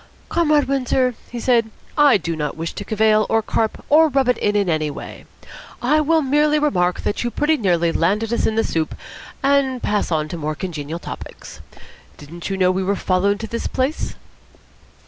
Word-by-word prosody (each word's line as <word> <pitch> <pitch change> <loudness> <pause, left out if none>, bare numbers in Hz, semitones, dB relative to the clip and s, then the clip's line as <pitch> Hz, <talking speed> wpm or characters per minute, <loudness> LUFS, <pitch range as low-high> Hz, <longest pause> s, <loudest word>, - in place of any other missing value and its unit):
"Comrade 305 -3 +3
Windsor," 260 -1 +1 0.2
he 240 - -6
said, 230 -2 +2 0.3
"I 290 -6 +6
do 165 -2 -4
not 150 -1 -3
wish 165 0 -4
to - - -6
cavil 215 0 +2
or 225 0 +2
carp 220 +1 -2
or 315 +2 +6
rub 270 -3 +1
it 250 - +2
in 205 0 0
in 200 -2 +2
any 155 -2 0
way. 145 - -9 0.5
I 300 +5 +2
will 320 +1 +2
merely 295 +2 +2
remark 180 -13 +1
that 205 - -2
you 240 - -1
pretty 295 +5 +1
nearly 175 - +1
landed 210 +8 0
us 235 - +1
in 220 - -1
the 225 - +2
soup, 160 -1 -2 0.5
and 275 -2 +2
pass 205 -3 0
on 155 -1 0
to 170 - -5
more 155 -1 -3
congenial 160 -2 -5
topics. - - -9 0.6
Didn't 170 +5 -8
you 195 - -2
know 185 -1 +3
we 185 +1 -1
were 200 +2 0
followed 195 +2 +1
to 225 - -4
this 230 +1 -3
place?" 265 +4 -2
220 Hz, 190 wpm, -20 LUFS, 175-270 Hz, 0.6 s, I